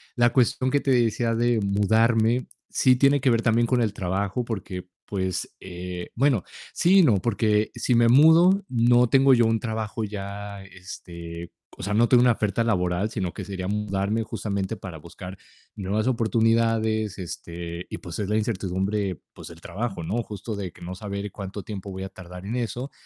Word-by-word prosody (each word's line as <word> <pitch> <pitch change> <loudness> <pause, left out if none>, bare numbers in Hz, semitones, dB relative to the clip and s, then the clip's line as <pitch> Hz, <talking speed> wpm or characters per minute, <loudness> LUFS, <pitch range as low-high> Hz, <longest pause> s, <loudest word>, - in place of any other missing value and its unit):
La 120 -1 +4
cuestión 130 0 +2
que 145 +1 +1
te 135 - 0
decía 115 -1 +2
de 120 0 +2
mudarme 110 +4 +2 0.2
sí 130 -1 +4
tiene 140 +1 +4
que 130 - +3
ver 115 -1 +3
también 115 +1 +2
con 125 0 +2
el 105 -3 0
trabajo, 100 +5 -2
porque 95 -5 -5 0.2
pues, 95 -3 -3
eh 90 -1 -7
bueno, 125 -6 +2 0.3
sí 190 +3 +4
y - - +7
no, 120 -10 +5
porque 105 +1 +1
si 125 - 0
me 115 0 +5
mudo 165 +8 +6
no 120 0 +4
tengo 135 0 +5
yo 120 -2 +5
un 115 0 +2
trabajo 110 -1 -3
ya, 100 -1 -6
este 85 -2 -9 0.3
o - - -8
sea, 105 +2 -2
no 115 +2 +4
tengo 125 -2 +5
una 125 0 +5
oferta 110 0 0
laboral, 90 -2 0
sino 90 -4 -3
que - - -6
sería 95 -2 -5
mudarme 105 +1 -1
justamente 100 -2 -3
para 90 -4 -8
buscar 90 +4 -10 0.4
nuevas 105 +3 -1
oportunidades, 115 -3 +1
este, 85 -1 -6
y, - - -5
pues, 85 - -8
es 100 - -2
la 105 - +2
incertidumbre, 95 -2 -1
pues - - -10
del 85 0 -12
trabajo, 95 +1 -4
¿no?, 115 +8 -2
justo 105 +1 -6
de 95 -3 -5
que - - -19
no 90 +2 -6
saber 100 -1 -5
cuánto 100 0 -6
tiempo 100 -2 -7
voy 95 0 -6
a 95 - -5
tardar 90 0 -11
en 115 +4 -3
eso, 125 +3 -3
105 Hz, 185 wpm, -25 LUFS, 95-115 Hz, 0.4 s, y